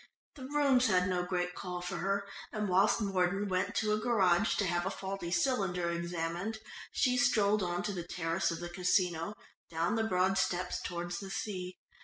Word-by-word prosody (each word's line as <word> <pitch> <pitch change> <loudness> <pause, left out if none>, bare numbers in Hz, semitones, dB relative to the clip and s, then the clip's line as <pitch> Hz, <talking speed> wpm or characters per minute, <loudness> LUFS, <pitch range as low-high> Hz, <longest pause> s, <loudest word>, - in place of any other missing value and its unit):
The 265 -4 -9
Rooms 275 -3 +3
had 180 -3 +3
no 180 -1 0
great 180 0 -1
call 180 -1 -5
for 180 0 -4
her, 200 +1 -1 0.2
and 210 -1 -2
whilst 195 +5 +3
Mordon 195 0 +1
went 195 +3 -1
to 215 -1 +1
a 215 - +1
garage 205 -3 +3
to 200 - +1
have 175 -1 0
a 190 - -1
faulty 195 -2 -5
cylinder 190 - +1
examined, 170 +4 -3 0.3
she 250 -2 +2
strolled 215 -5 +3
on 175 0 -1
to 205 - -2
the 180 - -3
terrace 170 +1 0
of 165 0 -4
the 175 - -5
Casino, 180 0 +1 0.3
down 165 +4 0
the 225 -1 +1
broad 190 -2 +2
steps 180 0 -1
towards 175 0 -4
the 195 - -7
sea. 185 -3 -4
185 Hz, 185 wpm, -32 LUFS, 175-210 Hz, 0.3 s, Rooms